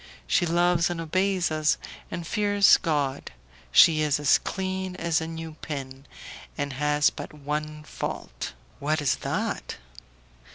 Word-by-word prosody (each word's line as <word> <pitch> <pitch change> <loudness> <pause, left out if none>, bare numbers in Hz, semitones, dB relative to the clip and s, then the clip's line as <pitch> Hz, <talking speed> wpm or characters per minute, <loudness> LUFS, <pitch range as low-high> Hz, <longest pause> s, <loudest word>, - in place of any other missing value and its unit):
She 175 - +2
loves 175 0 +3
and 175 -1 -3
obeys 185 +2 0
us, 155 0 +2 0.3
and 170 0 -5
fears 205 +1 +4
God; 145 -4 -1 0.4
she 155 - +7
is 150 -1 +1
as 145 -2 +4
clean 190 -1 -3
as 165 -2 0
a 160 - -4
new 165 0 -6
pin, 135 -2 -6 0.5
and 145 -1 -2
has 150 +2 +2
but - - -8
one 150 +1 -4
fault." - - -5 0.3
"What 155 +2 0
is 145 -4 +1
that?" - - -3
155 Hz, 135 wpm, -26 LUFS, 150-175 Hz, 0.5 s, she